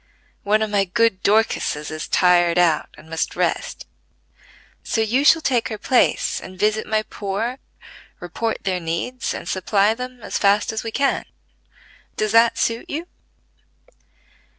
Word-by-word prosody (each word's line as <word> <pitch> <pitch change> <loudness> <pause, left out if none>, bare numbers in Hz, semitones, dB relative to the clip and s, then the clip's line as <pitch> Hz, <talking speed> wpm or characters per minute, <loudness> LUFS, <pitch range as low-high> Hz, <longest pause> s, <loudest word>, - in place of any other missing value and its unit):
One 215 +2 +2
of 215 - -3
my 200 -1 +2
good 225 0 +1
Dorcases 205 -8 +1
is 155 0 -5
tired 175 -1 +3
out 170 -3 +2
and - - -16
must 165 0 -3
rest; - - -2 1.0
so - - -2
you 225 +5 +1
shall 320 +2 +5
take 245 -4 +1
her 215 - -4
place 250 +3 +1
and 185 0 -11
visit 215 +2 0
my 215 0 +1
poor, 215 +6 -4 0.6
report 220 +6 -4
their 185 -2 -1
needs, 170 +10 -3
and - - -7
supply 200 +3 +2
them 250 0 -8
as - - -3
fast 205 +1 +3
as 220 - -3
we 225 - -4
can. 275 +5 0 0.9
Does 215 -1 0
that 230 +1 +4
suit 230 0 -1
you?" 320 +4 -4
215 Hz, 150 wpm, -21 LUFS, 185-230 Hz, 1.0 s, shall